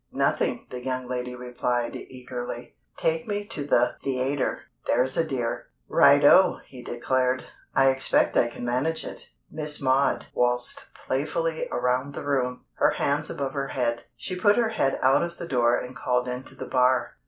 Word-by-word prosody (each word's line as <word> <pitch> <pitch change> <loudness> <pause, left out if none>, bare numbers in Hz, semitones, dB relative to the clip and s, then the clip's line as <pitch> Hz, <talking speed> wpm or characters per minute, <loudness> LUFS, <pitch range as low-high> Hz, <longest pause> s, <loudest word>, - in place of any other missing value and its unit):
"Nothing," - - 0
the 125 -1 -6
young 130 -1 -3
lady 125 0 -4
replied, 125 -1 -2
eagerly. 125 -1 -7 0.2
"Take 160 +3 0
me 205 -1 -2
to 150 - -2
the 125 -3 +2
theatre, 135 +1 -1 0.3
there's 125 +2 +2
a 165 - +3
dear." 130 -7 -3 0.2
"Righto!" - - +6
he 130 -2 -11
declared. 130 +1 0 0.3
"I 135 0 +6
expect 135 0 +2
I 120 - +4
can 120 +1 -7
manage 130 +7 -1
it." - - -7 0.2
Miss 150 -1 -2
Maud 135 0 +2
waltzed 125 0 0 0.2
playfully 160 +4 -1
around 125 +3 0
the - - -6
room, 125 -3 -1
her - - +5
hands 145 +2 0
above 135 -1 -3
her 140 -1 -2
head. 120 -3 -1
She 185 - -5
put 205 +4 +3
her 235 -2 +3
head 175 -11 0
out 130 +1 +5
of 170 0 -3
the 170 - -6
door 120 -4 +3
and 125 +1 -8
called 125 0 0
into 125 +1 -6
the - - -6
bar. 125 -1 +2
130 Hz, 165 wpm, -26 LUFS, 125-145 Hz, 0.3 s, Righto